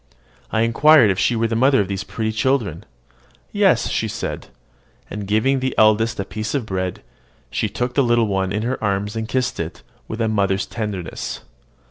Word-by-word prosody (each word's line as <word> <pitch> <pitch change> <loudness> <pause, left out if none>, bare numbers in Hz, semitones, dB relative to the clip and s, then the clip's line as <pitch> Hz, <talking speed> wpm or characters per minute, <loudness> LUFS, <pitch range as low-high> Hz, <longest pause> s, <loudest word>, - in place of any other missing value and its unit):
I 110 - 0
inquired 115 +1 +5
if 95 - -2
she 120 - +2
were 115 0 +1
the 115 - -2
mother 130 +3 +4
of 100 - +1
those 100 +1 -3
pretty 110 +1 -3
children. 110 - 0 0.7
"Yes," - - +3
she - - -1
said; - - -5 0.6
and, 105 -1 -5
giving 110 +7 +2
the 130 0 -2
eldest 110 +1 +3
a 100 - -2
piece 110 +5 -4
of 135 -5 -1
bread, 95 -3 -3 0.5
she - - -1
took 125 0 -3
the 140 - +3
little 120 -1 +3
one 95 -2 -1
in 105 +2 -1
her 125 0 -3
arms 105 +1 -1
and 110 -1 -3
kissed 130 -1 -1
it - - -5 0.2
with 110 - -6
a 115 - +1
mother's 100 -1 +1
tenderness. 105 -6 -5
110 Hz, 185 wpm, -21 LUFS, 100-120 Hz, 0.7 s, inquired